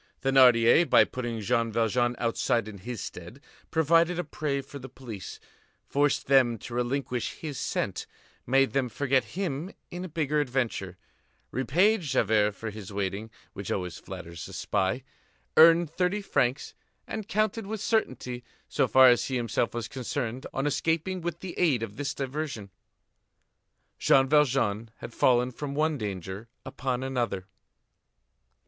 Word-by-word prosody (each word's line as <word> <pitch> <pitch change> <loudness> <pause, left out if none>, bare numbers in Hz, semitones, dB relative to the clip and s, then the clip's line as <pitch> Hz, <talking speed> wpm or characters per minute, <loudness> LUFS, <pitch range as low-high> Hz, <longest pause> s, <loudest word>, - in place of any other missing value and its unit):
Thénardier, 130 +2 +6
by - - +7
putting 120 -3 -4
Jean 115 +3 +1
Valjean 120 +2 +1
outside 115 0 0
in 105 -2 -9
his 115 +2 -6
stead, 90 +10 -8 0.3
provided 165 +2 +3
a 175 - -1
prey 145 -2 -2
for 140 +1 -10
the 135 +1 -9
police, 120 -6 -8 0.5
forced 145 0 +1
them 130 -4 +4
to 120 - -9
relinquish 125 0 -2
his 150 -5 -6
scent, - - -2 0.4
made 135 +2 +3
them 135 -2 0
forget 135 +1 +1
him 175 -2 -2 0.2
in 175 +1 -5
a 185 - -6
bigger 150 -1 0
adventure, 120 -9 -2 0.5
repaid 180 - +2
Javert 110 - +2
for 110 +3 -6
his 105 -2 -9
waiting, 100 +2 -3 0.2
which 100 -1 -6
always 90 -3 -3
flatters 85 -1 -8
a - - -11
spy, 95 +7 -1 0.5
earned 165 0 +7
thirty 185 +4 0
francs, 130 -7 0 0.3
and 215 -2 -5
counted 215 -1 0
with 220 +1 -4
certainty, 130 - -1 0.2
so - - +1
far 130 0 +7
as 120 -1 +4
he 130 - -3
himself 120 -1 0
was 115 -1 -4
concerned, 130 -1 -4
on 135 - -2
escaping 165 +5 0
with 170 0 -4
the 185 -2 -6
aid 145 -10 +3
of 105 -2 -6
this 145 0 -3
diversion. 135 -7 -4 1.3
Jean 135 0 +4
Valjean 125 -7 +2
had 120 - -9
fallen 125 0 +3
from 140 +2 -5
one 155 -1 +1
danger 100 +1 -5 0.2
upon 130 -1 -3
another. 120 -8 -2
130 Hz, 145 wpm, -28 LUFS, 115-150 Hz, 1.3 s, by